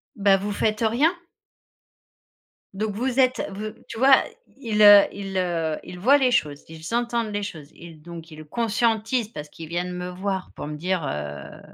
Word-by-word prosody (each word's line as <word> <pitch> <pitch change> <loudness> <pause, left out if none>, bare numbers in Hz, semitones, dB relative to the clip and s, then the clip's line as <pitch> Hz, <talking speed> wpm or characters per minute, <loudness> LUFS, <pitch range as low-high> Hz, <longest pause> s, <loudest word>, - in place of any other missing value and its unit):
bah, 200 -2 +4
vous 205 +2 -4
faites 215 0 0
rien?» 290 +9 +3 1.6
Donc 210 +1 -3
vous 260 +2 0
êtes, 255 0 +3
v 215 +2 -5
tu 230 - -8
vois, 265 +1 +7 0.4
i 245 -5 -8
ils, 210 0 +3
heu, 205 -1 +10
ils, 195 -1 -6
heu, 165 -4 -1
ils 180 - -9
voient 275 +9 +5
les 255 -2 +2
choses, 150 -10 0
ils 160 +5 -9
entendent 235 -2 -1
les 205 0 -2
choses, 155 -7 -8
ils 165 -3 -13
donc 170 -1 -10
ils 155 0 -10
conscientisent 225 - 0
parce 150 -8 -8
qu'ils 160 0 -10
viennent 175 +1 -3
me 180 0 -5
voir 190 +1 -4
pour - - -6
me 150 0 -5
dire 180 0 -1
heu, 75 - -6
195 Hz, 185 wpm, -24 LUFS, 165-230 Hz, 1.6 s, heu